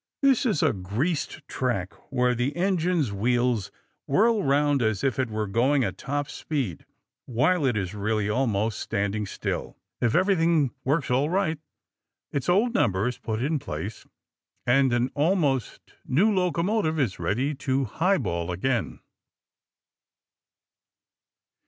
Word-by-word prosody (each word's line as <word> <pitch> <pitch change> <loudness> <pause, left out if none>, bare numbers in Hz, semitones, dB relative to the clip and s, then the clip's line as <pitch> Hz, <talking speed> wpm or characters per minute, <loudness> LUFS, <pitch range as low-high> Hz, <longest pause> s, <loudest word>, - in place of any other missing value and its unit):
This 270 -2 +4
is 205 -10 +1
a - - +3
greased 110 - -3
track 110 -7 -2 0.2
where 125 -2 +2
the 125 +4 -1
engine's 175 - +1
wheels 120 -1 +1 0.4
whirl 215 +9 +3
round 145 0 +2
as 110 -4 0
if 135 -1 0
it 130 -3 0
were 110 0 -2
going 130 +7 +2
at 95 -4 -3
top 145 +1 -2
speed 135 - -4 0.4
while 145 +6 +2
it 120 -4 +1
is 95 -2 -3
really 105 0 -1
almost 110 -2 0
standing 100 +1 -2
still. - - -4 0.2
If 120 -2 +2
everything 170 - +3
works 140 0 0
all 135 +4 +2
right, 175 -4 0 0.7
its 140 +4 -2
old 215 +7 +3
number 100 - +2
is 125 - -4
put 110 +1 -3
in 150 +2 0
place, 105 -4 -6 0.6
and 130 +1 +4
an 120 +1 +1
almost 145 - 0
new 200 +11 +3
locomotive 180 -2 +1
is 120 -9 0
ready 130 +8 0
to 135 -1 -1
highball 110 - 0
again. 115 +7 -1
130 Hz, 135 wpm, -26 LUFS, 110-160 Hz, 0.7 s, This